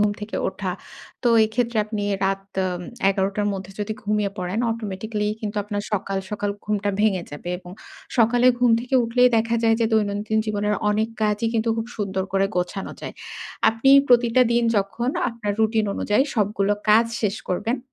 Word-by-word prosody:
ঘুম 210 0 +3
থেকে 210 +1 -5
ওঠা। - - -4 0.5
তো 245 - +3 0.2
এক্ষেত্রে 230 +2 -1
আপনি 210 -1 -3 0.2
রাত 195 0 0 0.2
এম 180 -1 -3 0.3
১১ 195 0 +1
টার 205 - +1
মধ্যে 190 0 -7
যদি 210 +1 -2
ঘুমিয়ে 210 -1 0
পড়েন, 180 +3 -2
অটোমেটিক্যালি 210 -1 -3
কিন্তু 210 -1 -4
আপনার 205 0 -3
সকাল, 195 -1 -1
সকাল 205 -1 -2
ঘুমটা 205 -1 0
ভেঙে 200 -4 +2
যাবে। 145 +4 -6
এবং 180 -1 -12 0.5
সকালে 240 +2 +4
ঘুম 245 -1 +4
থেকে 250 +2 -4
উঠলেই 245 +2 +4
দেখা 230 +1 +1
যায় 225 0 +4
যে, 225 - +3
দৈনন্দিন 210 0 +1
জীবনের 210 0 0 0.2
অনেক 215 +2 +1
কাজই 210 +1 +1
কিন্তু 225 0 +1
খুব 225 0 -2
সুন্দর 190 -2 -2
করে 195 0 +3
গোছানো 180 +2 -2
যায়। - - -7 0.5
আপনি 225 +4 +2 0.2
প্রতিটা 240 0 +5
দিন 235 0 +3
যখন 200 +5 -1 0.2
আপনার 230 -3 -3
রুটিন 220 0 +2
অনুযায়ী 210 +5 +2
সবগুলো 205 -2 +1 0.2
কাজ 225 +2 +6 0.2
শেষ 210 0 0
করবেন। 225 +8 -1
210 Hz, 170 wpm, -23 LUFS, 200-225 Hz, 0.5 s, কাজ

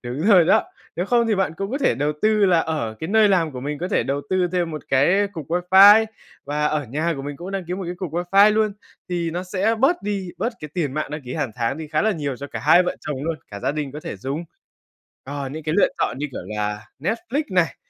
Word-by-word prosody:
đúng 125 +3 -5
rồi 195 -4 +6
đó, - - +4 0.3
nếu 175 - -1
không 235 +1 +3
thì 220 - +2
bạn 190 -4 0
cũng 195 +3 -4
có 270 - -2
thể 280 - +2
đầu 145 +5 0
tư 215 -1 +4
là 175 -3 +4
ở 150 -10 -3
cái 160 - -4
nơi 215 +1 +5
làm 170 -6 +2
của 125 - -6
mình 145 +2 -4
có 180 - -3
thể 200 - +1
đầu 135 +4 -2
tư 185 -1 +2
thêm 175 -2 0
một 155 -3 -6
cái 175 +10 +3
cục 160 -7 -7
wifi 190 +5 +7 0.4
và 150 +1 0
ở 150 -2 -1
nhà 155 +8 -1
của 135 - -6
mình 145 0 -6
cũng 175 +3 -7
đăng 195 -2 -3
ký 180 - -3
một 190 -1 -5
cái 175 - -4
cục 175 -4 -5
wifi 195 +5 +4
luôn 215 -1 +1 0.4
thì 170 -2 -1
nó 175 +2 -3
sẽ 195 +4 0
bớt 285 +7 +3
đi, 200 -3 -3
bớt 235 +6 -1
cái 150 - -8
tiền 155 -7 -1
mạng 155 -1 -3
đăng 150 -1 -5
ký 125 0 -7
hàng 125 - -2
tháng 120 +2 -1
đi 160 -1 -7
khá 155 0 0
là 220 - +3
nhiều 145 -6 -3
cho 140 - -7
cả - - -6
hai 175 +4 +6
vợ 180 - -3
chồng 140 -2 -5
luôn, 165 -1 -2
cả 100 -1 -7
gia - - 0
đình 150 -3 -4
có 150 - -7
thể - - -6
dùng. 135 - -4 0.8
Ờ, 140 0 -5
những 155 +3 -7
cái 155 +2 -2
lựa - - +5
chọn - - -1
như 150 - -2
kiểu - - -6
là 105 0 -3
Netflix 250 - -1
này, 175 -6 +1
165 Hz, 270 wpm, -22 LUFS, 145-195 Hz, 0.8 s, wifi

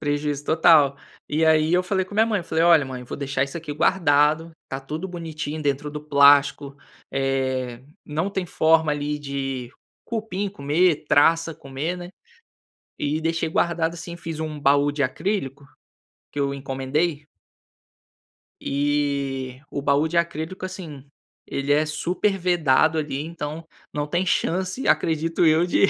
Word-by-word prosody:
Prejuízo 145 -1 -2
total. 155 -3 +5 0.3
E 155 +2 +1
aí 160 0 +4
eu 180 +1 +4
falei 190 0 0
com 185 - -16
a - - -5
minha 220 +1 +5
mãe, 210 -5 0
falei: 165 -1 0
"Olha 165 -4 +6
mãe, 130 -1 -7
vou - - -6
deixar 140 -1 -1
isso 140 +4 -8
aqui 155 -3 -5
guardado, 150 0 +2 0.2
tá 135 - -4
tudo 155 +7 -5
bonitinho, 155 -3 -5
dentro 145 0 -1
do 150 0 -6
plástico, 140 -1 +4 0.4
eh, 130 -2 -1 0.2
não 155 +5 -2
tem 190 -2 -2
forma 160 -2 +3
ali 145 0 -2
de 135 -3 -4 0.3
cupim 215 -3 -3
comer, 155 0 +1
traça 165 +2 +4
comer, 145 +4 -4
né". 175 0 -8 0.9
E 150 +2 -1
deixei 165 0 0
guardado 165 0 0
assim, 170 +1 -8
fiz 165 -2 -6
um 155 -1 -4
baú 140 +1 +3
de 145 0 -3
acrílico, 140 -1 -2 0.7
que 145 - -5
eu 140 0 0
encomendei 140 +3 -2 1.4
eh, 140 -2 -1
o 140 - -4
baú 145 +3 +2
de 170 - -4
acrílico, 170 +2 -2
assim, 165 -7 -8 0.4
ele 140 +1 -1
é 150 +2 +3
super 180 +6 -1
vedado 160 -4 +3
ali, 145 -3 -2
então, 160 0 -6 0.3
não 145 0 -2
tem 175 +5 0
chance, 185 +6 -1
acredito 165 +1 +1
eu 160 +2 +4
de 180 - +4
150 Hz, 150 wpm, -23 LUFS, 140-170 Hz, 1.4 s, Olha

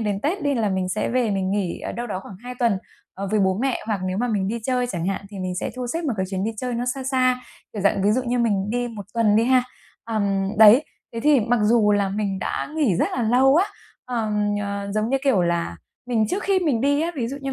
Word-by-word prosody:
đến 205 -2 -1
Tết 340 +6 -1
đi 285 -1 +1
là 220 -4 +1
mình 190 -1 -1
sẽ 210 - -1
về 245 -3 +1
mình 190 -1 -1
nghỉ, 195 -4 -2
ờ, - - -5
đâu 240 +1 -4
đó 190 -3 -4
khoảng 190 -1 -11
2 250 0 -7
tuần, 230 -6 +2 0.4
ờ, 195 0 -4
với 215 -1 +2
bố 190 +1 +2
mẹ, 265 -2 0
hoặc 210 -4 -1
nếu 185 +1 -2
mà 245 +1 0
mình 200 -3 0
đi 235 +2 -2
chơi 250 -1 +1
chẳng 175 -7 -3
hạn 195 - -1
thì 200 - -8
mình 185 -1 -3
sẽ 180 - -3
thu 250 -1 -3
xếp 330 +7 -3
một 270 - 0
cái 190 0 -1
chuyến 190 0 -2
đi 220 - 0
chơi 250 +1 -3
nó 240 +1 -2
xa 270 - -6
xa, 255 -1 +2 0.3
kiểu 205 -3 -4
dạng, 200 -1 +2
ví 205 - +3
dụ 255 - +1
như 245 0 -1
mình 205 -3 +1
đi 245 0 -1
1 210 -4 -8
tuần 215 -2 +3
đi 225 - +4
ha. 255 0 +4 0.4
Ờm, 200 -3 0
đấy, 225 +7 +8 0.3
thế 230 - -4
thì 290 -2 +4
mặc 235 +1 +1
dù 210 -1 +4
là 200 -1 +2
mình 195 -1 -2
đã - - -3
nghỉ 245 - +2
rất - - +1
là 245 - 0
lâu 260 +5 +4
á, 370 - +5 0.4
ờm, 210 -4 -1
ờ, 200 0 -4
giống 215 +3 0
như 270 - +3
kiểu 225 -10 +3
là, 170 - -1 0.3
mình 225 -3 +1
trước 400 - -2
khi 390 -1 +2
mình 290 -11 +1
đi 285 +2 +2
á, 335 +2 0
ví 235 -3 -1
dụ 275 - -5
như 270 0 -3
225 Hz, 275 wpm, -23 LUFS, 200-250 Hz, 0.4 s, đấy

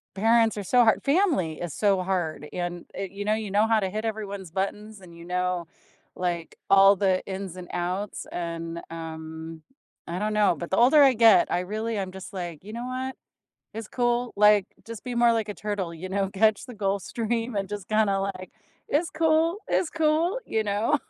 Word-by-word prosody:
Parents 225 +1 +3
are 205 - -3
so 245 +6 +4
hard 220 - +3
family 280 - +1
is 175 -4 -4
so 195 -3 +2
hard 170 -6 -2
and 175 -1 -4
it 195 -1 -4
you 200 +1 -6
know, 210 - +2
you 215 -1 -3
know 205 +3 +3
how 225 -1 +3
to 190 -2 -1
hit 215 +3 -4
everyone's 200 -5 -5
buttons 205 +2 -4
and 170 -2 -14
you 170 - -11
know, 180 -1 -1 0.5
like, 175 -2 -3
all 195 0 +7
the 190 -1 +1
ins 190 -2 -5
and 180 -1 -8
outs 180 +4 -3
and, 170 -1 -4
um, 160 0 -7 0.4
I 175 +2 -4
don't 210 +1 -1
know, 210 -4 +3
but 170 - -6
the 190 - 0
older 265 +6 +6
I 270 -2 +7
get, 225 -5 +5
I 175 - +1
really 215 +4 -3
am 190 -2 -3
just 190 +1 -10
like, 175 -4 -6
"You 215 +2 -9
know 240 +1 -5
what? 260 +1 -4 0.6
It's 220 -1 -6
cool," 240 0 0
like, 210 -1 +5 0.2
just 230 -1 -8
be 250 -1 -4
more 235 0 +5
like 225 -2 -1
a - - -3
turtle, 205 -5 -3
you 185 +3 -7
know? 195 0 0
Catch 215 +3 +2
the 250 - -9
Gulf 200 -1 -1
Stream 230 0 -2
and 195 -1 -1
just 205 -1 -6
kinda 215 -2 +2
like, 190 -1 -4 0.4
"It's 330 +4 +1
cool, 320 +3 +2
It's 335 - +1
cool," 325 +7 +1
you 220 -1 0
know? 210 +7 +1
200 Hz, 200 wpm, -26 LUFS, 180-225 Hz, 0.6 s, all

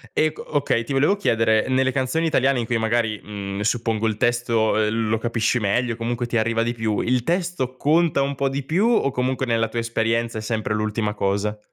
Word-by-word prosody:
Ec 155 0 +1
okay, 135 -5 -1
ti 130 - -5
volevo 145 +9 +3
chiedere, 115 - +2
nelle 130 0 +2
canzoni 130 +5 0
italiane- 135 -4 +2
in 115 - -3
cui 120 - 0
magari, 110 -1 0
mhmm, 100 -1 -5
suppongo 115 0 0
il 110 -1 -1
testo, 120 -2 +1
ehm, 110 +1 0
lo 110 - +2
capisci 115 +1 0
meglio, 115 +3 0
comunque 120 +1 -2
ti 120 - -3
arriva 115 0 +1
di 120 +1 -1
più- 110 -3 -1
il 125 0 +1
testo 170 -7 -2
conta 160 0 +2
un 140 +1 0
po' 135 0 -1
di 140 +1 -3
più 170 - +1
o 225 -12 +2
comunque 130 +1 -1
nella 115 -1 +1
tua 115 - -4
esperienza 115 0 -1
è 110 - -3
sempre 110 -1 -2
l'ultima 105 0 -1
cosa? 100 +2 -1
115 Hz, 205 wpm, -22 LUFS, 110-130 Hz, -, volevo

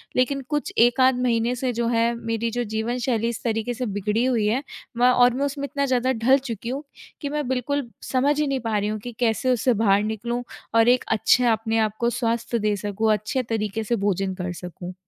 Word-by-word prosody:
लेकिन 275 +2 +1
कुछ 295 -1 -1
1 240 +2 +4
आध 255 -1 +4
महीने 235 0 +1
से 250 0 -2
जो 235 0 -1
है 235 0 +2
मेरी 230 0 -2
जो 245 +1 -1 0.2
जीवनशैली 240 -1 -1
इस 235 - -6
तरीके 225 +1 -1
से 250 +1 -3
बिगड़ी 210 +2 -1
हुई 235 -5 +1
है, 245 +6 0 0.3
मैं 245 +1 +5
और 245 -1 +5
मैं 275 +2 0
उसमें 280 0 -3
इतना 280 0 -1
ज़्यादा 255 -1 +1
ढल 255 +3 +4
चुकी 235 -4 -6
हूँ, 275 +4 -3 0.4
कि 285 - -3
मैं 295 -2 -2
बिल्कुल 260 0 -1 0.2
समझ 285 +3 +2
ही 300 - +1
नहीं 275 -1 0
पा 225 -3 -1
रही 205 +1 0
हूँ 215 0 -3
कि 245 +3 -7
कैसे 240 +1 +1
उससे 250 +1 +2
बाहर 205 -2 +3
निकलूँ 235 +3 -3 0.3
और 230 +1 +5
एक 250 +1 +4
अच्छे 245 +3 +3
अपने 225 0 0
आप 215 -1 0
को 235 0 +2
स्वास्थ्य 235 0 -1
दे 210 0 +1
सकूँ, 205 +2 0
अच्छे 230 +6 -1
तरीके 220 -1 -2
से 235 +3 0
भोजन 195 -2 -1
कर 180 -1 -4
सकूँ। 180 +1 -8
235 Hz, 220 wpm, -24 LUFS, 220-255 Hz, 0.4 s, मैं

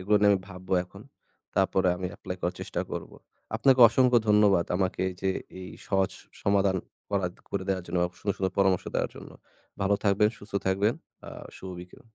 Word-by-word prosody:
এগুলো 105 +3 +3
নিয়ে 105 0 +6
আমি 100 - +4
ভাবব 95 0 -11 0.2
এখন। 100 +3 -14 0.5
তারপরে 95 -1 +3
আমি 90 0 -3
apply 90 - -6
করার 90 +1 -1
চেষ্টা - - -3
করব। - - -5 0.5
আপনাকে 130 +1 +4
অসংখ্য 125 +1 +4
ধন্যবাদ 105 -4 +5
আমাকে 95 -1 -1 0.2
যে, 95 0 +1 0.3
এই 90 - -7 0.2
সহজ 95 -1 +1 0.3
সমাধান 100 -1 +2 0.3
করা 95 -3 +1 0.2
করে 95 -1 -2
দেওয়ার 95 -2 0
জন্য 85 +1 -3
এবং 90 - -4
সুন্দর, 100 -2 -1
সুন্দর 95 -1 -1
পরামর্শ 95 -2 +3
দেওয়ার - - 0
জন্য। - - -10 0.5
ভালো 100 +1 +3
থাকবেন, 100 +1 +4
সুস্থ 100 +1 -14
থাকবেন। 100 +4 +2 0.3
আ - - -7 0.3
শুভ 95 - -8
বিকেল। 90 +1 -13
95 Hz, 180 wpm, -27 LUFS, 95-100 Hz, 0.5 s, নিয়ে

